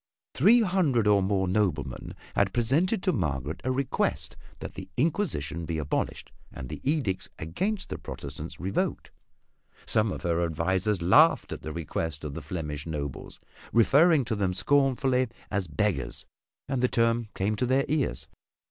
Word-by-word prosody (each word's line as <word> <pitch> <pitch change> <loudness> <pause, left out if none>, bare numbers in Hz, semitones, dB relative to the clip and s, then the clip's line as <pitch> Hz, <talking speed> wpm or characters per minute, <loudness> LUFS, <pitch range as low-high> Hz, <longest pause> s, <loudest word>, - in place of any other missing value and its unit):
Three 220 - +6
hundred 175 - +2
or 105 -1 +5
more 95 0 +1
noblemen 90 -10 -1 0.2
had 100 -2 +2
presented 155 - +2
to 185 - +2
Margaret 75 - -2
a 130 - 0
request 130 0 -1 0.2
that - - -7
the - - -8
Inquisition 120 - 0
be 80 0 -3
abolished 75 -2 -2 0.2
and 65 - -8
the - - -7
edicts 130 -11 0
against 190 - -2
the - - -5
Protestants 75 +3 -7
revoked. 95 +2 -2 0.7
Some 110 -2 +2
of - - -6
her 85 -1 +1
advisors 90 +4 0
laughed 150 - +5
at - - -5
the 80 - -5
request 80 -1 -4
of 75 -2 -4
the 80 - -5
Flemish 75 -1 -5
nobles, 70 -4 -5 0.3
referring 140 +5 +5
to 110 - -1
them 95 -3 0
scornfully 135 -1 +2 0.2
as 100 -3 -1
"beggars," 105 +6 -1 0.4
and 135 -3 -1
the 125 - +4
term 115 -1 +1
came 100 +3 0
to 125 - 0
their 135 +2 +3
ears. 140 - -1
105 Hz, 155 wpm, -28 LUFS, 80-135 Hz, 0.7 s, Three